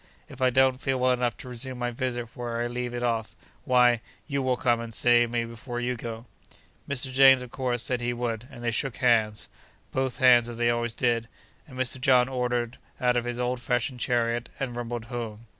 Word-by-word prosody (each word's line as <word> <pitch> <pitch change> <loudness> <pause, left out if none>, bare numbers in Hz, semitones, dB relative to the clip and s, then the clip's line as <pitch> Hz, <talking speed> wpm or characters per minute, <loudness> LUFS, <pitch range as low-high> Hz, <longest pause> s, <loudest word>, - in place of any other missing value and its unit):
If 130 - -12
I 130 - +5
don't 130 +1 +3
feel 135 -2 0
well 130 0 +3
enough 125 -1 0
to 135 - -10
resume 125 +1 -5
my 120 0 -2
visit 120 -1 -3
where 120 -1 -4
I 120 - 0
leave 120 0 -3
it 120 - -3
off, 115 -2 -1 0.3
why 125 -2 +4 0.2
you 140 -2 -2
will 130 -1 +1
come 120 -2 +2
and 115 -1 -6
see 120 +1 +4
me 115 0 -1
before 120 +2 -6
you 125 +1 -1
go.' 115 0 -7 0.6
Mr. 130 -1 +1
James, 135 -1 +7
of 125 - -11
course, 125 -3 -2
said 125 -2 -1
he 120 0 0
would, 120 -1 -3
and 120 - -11
they 120 - +1
shook 125 +2 -2
hands—both 120 +2 -1
hands, 120 -2 +5
as 120 - -7
they 120 0 +2
always 120 -1 -2
did—and 120 +3 -3
Mr. 130 0 -1
John 125 -1 +5
ordered 125 -2 -2 0.2
out 125 -1 +3
his 120 0 -2
old 125 0 -1
fashioned 125 +1 -1
chariot 120 -1 0
and 130 -3 -3
rumbled 120 -1 -4
home. 115 -2 -6
120 Hz, 200 wpm, -27 LUFS, 120-125 Hz, 0.6 s, James